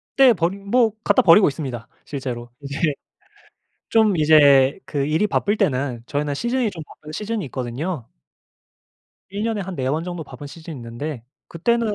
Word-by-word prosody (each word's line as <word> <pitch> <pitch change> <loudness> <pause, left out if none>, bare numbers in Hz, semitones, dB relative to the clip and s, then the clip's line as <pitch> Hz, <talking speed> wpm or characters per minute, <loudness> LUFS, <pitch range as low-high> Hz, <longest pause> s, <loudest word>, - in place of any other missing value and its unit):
떼 265 -3 +7
버리 180 0 -1
뭐 220 +3 +2
갖다 205 - +4
버리고 190 +3 +7
있습니다 130 -6 -4 0.2
실제로. 125 -4 -5
이제 140 0 -6 1.1
좀 220 -4 +3
이제 145 -2 +5
그 140 -3 -2
일이 160 +8 +1
바쁠 205 0 +1
때는 130 - 0
저희는 145 +2 -2
시즌이 240 - 0
좀 165 -4 -8
바쁜 150 0 -13
시즌이 215 +1 -3
있거든요. 130 +3 -4 1.2
1 200 +2 -4
년에 225 -2 -1
한 190 -1 -6
4 130 -3 -1
번 155 +4 -1
정도 175 -2 -5
바쁜 145 0 -10
시즌이 160 +2 -9
있는데 120 +2 -6 0.2
그때는 230 +5 0
155 Hz, 305 characters per minute, -22 LUFS, 140-200 Hz, 1.2 s, 떼